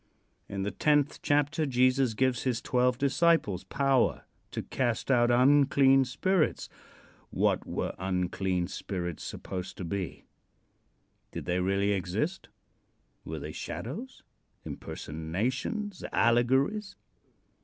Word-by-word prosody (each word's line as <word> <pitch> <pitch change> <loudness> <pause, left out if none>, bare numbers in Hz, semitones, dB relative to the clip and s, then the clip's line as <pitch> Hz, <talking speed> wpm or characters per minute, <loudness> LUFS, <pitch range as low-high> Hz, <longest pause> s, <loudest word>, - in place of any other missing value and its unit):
In 100 -1 -3
the 100 - -2
tenth 145 +7 +2
chapter 145 +2 +1
Jesus 130 -2 +2
gives 130 -1 +1
his 125 -3 0
twelve 125 0 +1
disciples 140 - +2
power 135 -2 +1 0.2
to - - -4
cast 120 0 -1
out 120 -2 +4
unclean 135 +1 +5
spirits. 155 +7 0 0.6
What - - +1
were - - -2
unclean 90 0 -1
spirits 90 -4 -5
supposed 95 0 -6
to 90 - -5
be? 95 0 -4 1.1
Did - - -6
they 90 +1 0
really 100 +2 +1
exist? 100 - -2 0.8
Were - - -5
they - - -6
shadows, 260 +2 -6 0.4
impersonations, 120 - -4
allegories? 130 - +2
125 Hz, 105 wpm, -29 LUFS, 95-140 Hz, 1.1 s, unclean